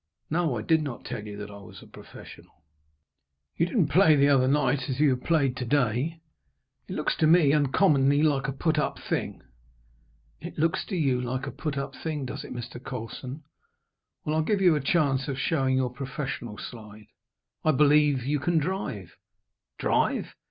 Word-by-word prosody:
"No; 160 Hz, -6 st, +1 dB
I 105 Hz, -, -4 dB
did 160 Hz, +5 st, +3 dB
not 140 Hz, -6 st, -6 dB
tell 120 Hz, -4 st, -5 dB
you 105 Hz, -1 st, -8 dB
that 105 Hz, 0 st, -7 dB
I 100 Hz, -, -10 dB
was 100 Hz, -, -13 dB
a -, -, -14 dB
professional." -, -, -14 dB, 0.9 s
"You 170 Hz, -, +1 dB
didn't 175 Hz, -, +1 dB
play 160 Hz, 0 st, +5 dB
the 140 Hz, 0 st, +4 dB
other 130 Hz, -2 st, +4 dB
night 135 Hz, -1 st, +1 dB
as 130 Hz, 0 st, -3 dB
you 150 Hz, -2 st, +4 dB
have 125 Hz, -1 st, -2 dB
played 140 Hz, -6 st, +2 dB
to 125 Hz, -, -3 dB
day. 140 Hz, +5 st, 0 dB, 0.7 s
It -, -, -5 dB
looks -, -, 0 dB
to 155 Hz, -, +3 dB
me 155 Hz, -3 st, +5 dB
uncommonly 145 Hz, -1 st, +3 dB
like 140 Hz, -3 st, +2 dB
a -, -, -1 dB
put 155 Hz, +3 st, 0 dB
up -, -, -1 dB
thing." -, -, -4 dB, 1.0 s
"It -, -, -9 dB
looks 160 Hz, +1 st, 0 dB
to 195 Hz, -, -4 dB
you 135 Hz, -7 st, +1 dB
like 130 Hz, +2 st, -3 dB
a 140 Hz, -, -5 dB
put 150 Hz, -3 st, -4 dB
up 140 Hz, -, -4 dB
thing, 150 Hz, -4 st, -4 dB
does 140 Hz, +3 st, -6 dB
it, -, -, -10 dB
Mr. 120 Hz, 0 st, -7 dB
Colson. 125 Hz, +4 st, -7 dB, 0.8 s
Well, 155 Hz, 0 st, 0 dB
I'll 160 Hz, -, +2 dB
give 200 Hz, +6 st, 0 dB
you 180 Hz, -3 st, +5 dB
a 150 Hz, -, -1 dB
chance 135 Hz, -2 st, +1 dB
of 135 Hz, -2 st, -3 dB
showing 135 Hz, -3 st, +1 dB
your 130 Hz, -2 st, 0 dB
professional 125 Hz, -4 st, -5 dB
side. 105 Hz, -2 st, -10 dB, 0.6 s
I -, -, +2 dB
believe 145 Hz, -2 st, +4 dB
you 145 Hz, +2 st, 0 dB
can 170 Hz, +4 st, +1 dB
drive?" 150 Hz, -, -3 dB, 0.6 s
"Drive!" -, -, 0 dB
140 Hz, 185 wpm, -27 LUFS, 125-155 Hz, 1.0 s, play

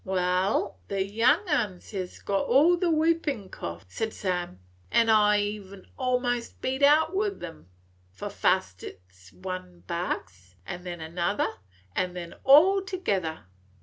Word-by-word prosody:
"Wal, 185 Hz, +1 st, 0 dB
the 195 Hz, -1 st, -1 dB
young 230 Hz, -, +2 dB
uns 215 Hz, -, -1 dB
hes 185 Hz, -3 st, -6 dB
all 255 Hz, -, +4 dB
got 350 Hz, -, -1 dB
the 355 Hz, -, +2 dB
whoopin' 310 Hz, -, +1 dB
cough," 85 Hz, +2 st, -7 dB
said 220 Hz, -, -3 dB
Sam, 180 Hz, -, -3 dB, 0.3 s
"an' 230 Hz, -1 st, +4 dB
I 210 Hz, -1 st, +5 dB, 0.2 s
'm 195 Hz, -1 st, -14 dB
e'en 190 Hz, -2 st, -13 dB
a 255 Hz, -1 st, +2 dB
'most 245 Hz, -1 st, -3 dB
beat 265 Hz, +2 st, -2 dB
out 310 Hz, +5 st, +5 dB
with 400 Hz, 0 st, -1 dB
'em. 80 Hz, +3 st, -9 dB, 0.4 s
For 95 Hz, -, -7 dB
fust -, -, 0 dB
it -, -, -8 dB
's 95 Hz, -1 st, -19 dB
one 185 Hz, -1 st, -7 dB
barks, 95 Hz, -, -4 dB
an 180 Hz, +1 st, -7 dB
then 175 Hz, -2 st, -6 dB
another, 170 Hz, +5 st, -1 dB, 0.5 s
an' 180 Hz, -1 st, -1 dB
then 170 Hz, -1 st, -6 dB
all 350 Hz, +8 st, +7 dB
together. 200 Hz, -, -2 dB
195 Hz, 150 wpm, -27 LUFS, 175-270 Hz, 0.5 s, all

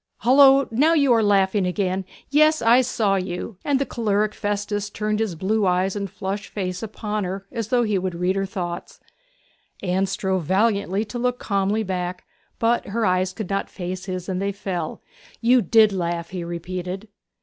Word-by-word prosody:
'Hullo! 270 Hz, +2 st, +6 dB
now 300 Hz, +8 st, +3 dB
you 280 Hz, -5 st, +4 dB
are 225 Hz, -, +4 dB
laughing 195 Hz, -2 st, +2 dB
again; 190 Hz, 0 st, -1 dB, 0.3 s
yes, 305 Hz, +2 st, +5 dB
I 235 Hz, +2 st, +5 dB
saw 220 Hz, -6 st, +1 dB
you!' 185 Hz, +2 st, -4 dB
And 285 Hz, -2 st, +2 dB
the 275 Hz, -, 0 dB
choleric 215 Hz, -3 st, 0 dB
Festus 205 Hz, 0 st, -2 dB
turned 215 Hz, +1 st, -2 dB
his 215 Hz, -6 st, -1 dB
blue 200 Hz, +4 st, +1 dB
eyes 185 Hz, +2 st, +1 dB
and 200 Hz, -1 st, -3 dB
flushed 195 Hz, +3 st, -4 dB
face 185 Hz, -3 st, -4 dB
upon 215 Hz, -1 st, -3 dB
her 190 Hz, +2 st, -4 dB
as 230 Hz, -4 st, -3 dB
though 245 Hz, +1 st, +2 dB
he 210 Hz, -4 st, +1 dB
would 185 Hz, -1 st, -3 dB
read 180 Hz, +2 st, 0 dB
her 195 Hz, 0 st, -1 dB
through. 175 Hz, -3 st, -3 dB, 1.0 s
Anne 190 Hz, +1 st, +1 dB
strove 190 Hz, -1 st, -1 dB
valiantly 200 Hz, +2 st, +1 dB
to 220 Hz, +3 st, -6 dB
look 250 Hz, 0 st, 0 dB
calmly 200 Hz, +1 st, 0 dB
back; 180 Hz, -2 st, -3 dB, 0.3 s
but 230 Hz, +1 st, +1 dB
her 220 Hz, +3 st, -1 dB
eyes 185 Hz, 0 st, +1 dB
could 200 Hz, 0 st, -6 dB
not 195 Hz, -, -1 dB
face 185 Hz, +1 st, -5 dB
his, 185 Hz, -2 st, -5 dB
and 190 Hz, -1 st, -2 dB
they 200 Hz, 0 st, 0 dB
fell. 185 Hz, -5 st, -4 dB, 0.4 s
'You 245 Hz, +2 st, +4 dB
did 215 Hz, +1 st, +5 dB
laugh!' 170 Hz, -2 st, -2 dB
he 180 Hz, -2 st, -4 dB
repeated. 180 Hz, +4 st, -5 dB
200 Hz, 180 wpm, -23 LUFS, 185-220 Hz, 1.0 s, Hullo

